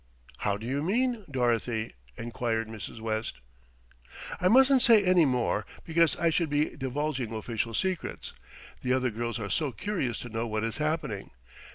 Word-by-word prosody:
"How 100 -1 0
do 110 - -8
you 135 +4 -1
mean, 230 - 0
Dorothy?" 120 -3 0 0.2
enquired 115 -1 -2
Mrs. 110 0 -7
West. 110 0 -2 1.0
"I 180 - +3
mustn't 265 +4 +6
say 225 -4 +6
any 180 -3 +5
more, 125 -5 +1 0.2
because 165 -2 +3
I 170 -1 +2
should 165 -1 +1
be 150 +1 +1
divulging 135 -3 -2
official 115 0 -2
secrets. 185 +4 -2 0.5
The 125 - +1
other 130 -1 +1
girls 115 +2 -3
are 100 -3 -4
so 150 -4 0
curious 155 - -2
to 120 - -7
know 115 +1 -2
what 110 0 -1
is 115 -1 -2
happening. 150 - -2
125 Hz, 160 wpm, -29 LUFS, 115-165 Hz, 1.0 s, mustn't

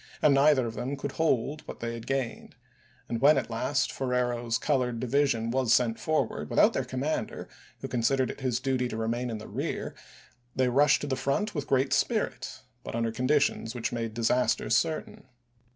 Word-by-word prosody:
and 150 - +5
neither 140 -2 +4
of 115 - -4
them 135 +5 -4
could 140 - -4
hold 150 -1 0
what - - -8
they 115 0 -3
had 115 -1 -8
gained; 135 -3 -3 0.5
and 115 - -3
when 145 +2 +6
at 130 - -2
last 130 +4 0
Ferrero's 120 -3 -1
colored 125 -4 0
division 125 -2 +1
July 130 - +1
30, - - +3
was 115 - +4
sent 115 -2 +1
forward 155 -7 -1
without - - +4
their - - 0
commander, 135 +4 -3 0.3
who - - -4
186± - - -18
considered 125 +2 +1
it - - -11
his 125 -2 0
duty 130 -1 0
to 110 - -5
remain 120 +2 -1
in 115 - -3
the 110 - -9
rear, - - -4 0.6
they 130 -1 +2
rushed 145 +4 +4
to 145 - -3
the 135 - 0
front 140 +11 -1
with 145 -4 -4
great 135 0 +2
spirit, - - -1 0.2
but - - -6
under 115 -1 0
conditions 125 -2 +1
which 120 - -2
made 115 -2 -3
disaster 120 0 +1
certain. 155 +4 0
125 Hz, 195 wpm, -28 LUFS, 115-140 Hz, 0.6 s, when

